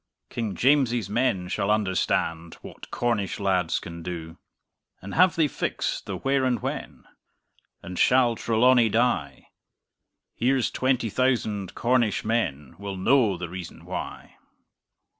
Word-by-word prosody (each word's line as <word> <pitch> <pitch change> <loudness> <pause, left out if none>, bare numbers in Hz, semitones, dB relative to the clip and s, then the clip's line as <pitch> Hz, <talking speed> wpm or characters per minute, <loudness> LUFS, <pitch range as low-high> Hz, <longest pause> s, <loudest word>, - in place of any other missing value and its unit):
King 110 -4 -3
James's 120 -6 +2
men 110 -6 +1
shall 100 +2 -1
understand 95 -5 0
What - - -11
Cornish 110 -6 -1
lads 95 -4 +1
can 85 0 -7
do! 80 -2 -7 0.6
And 100 +2 -8
have 185 0 +4
they 160 -2 +3
fixed - - -3
the - - -3
where 135 0 +1
and 125 -3 +1
when? - - -5 0.8
And 90 0 -6
shall 125 -2 +4
Trelawny 120 +1 +3
die? 110 - 0 0.8
Here's 130 +1 +1
twenty 130 -4 0
thousand 110 -7 0
Cornish 120 -3 +1
men 75 - -1
Will 100 -1 -5
know 110 -1 +3
the 85 - -5
reason 90 0 -9
why! - - -7
110 Hz, 125 wpm, -25 LUFS, 90-125 Hz, 0.8 s, have